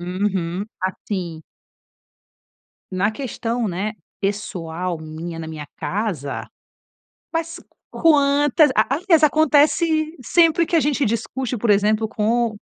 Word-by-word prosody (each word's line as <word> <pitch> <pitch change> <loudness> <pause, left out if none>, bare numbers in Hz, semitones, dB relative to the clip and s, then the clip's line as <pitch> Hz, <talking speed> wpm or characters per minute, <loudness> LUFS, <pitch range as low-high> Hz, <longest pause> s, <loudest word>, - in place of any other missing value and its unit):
Uhum, 185 0 -2 0.2
assim 185 -3 -4 1.5
na 195 +4 +1
questão, 235 -2 -3
né, 195 +4 -2 0.3
pessoal 180 -4 -3
minha, 160 +2 -7
na 160 - -6
minha 150 -2 -7
casa, 185 - -3 0.9
mas 330 +1 -3 0.3
quantas 290 -1 +4
a 270 - +3
alias, 330 -2 +3
acontece 310 +2 +3
sempre 335 +4 +3
que 335 - +1
a - - +5
gente 290 -1 +1
discute, 235 +3 -2
por 220 0 0
exemplo, 210 +2 +3
com 225 +1 0
220 Hz, 110 wpm, -21 LUFS, 185-295 Hz, 1.5 s, a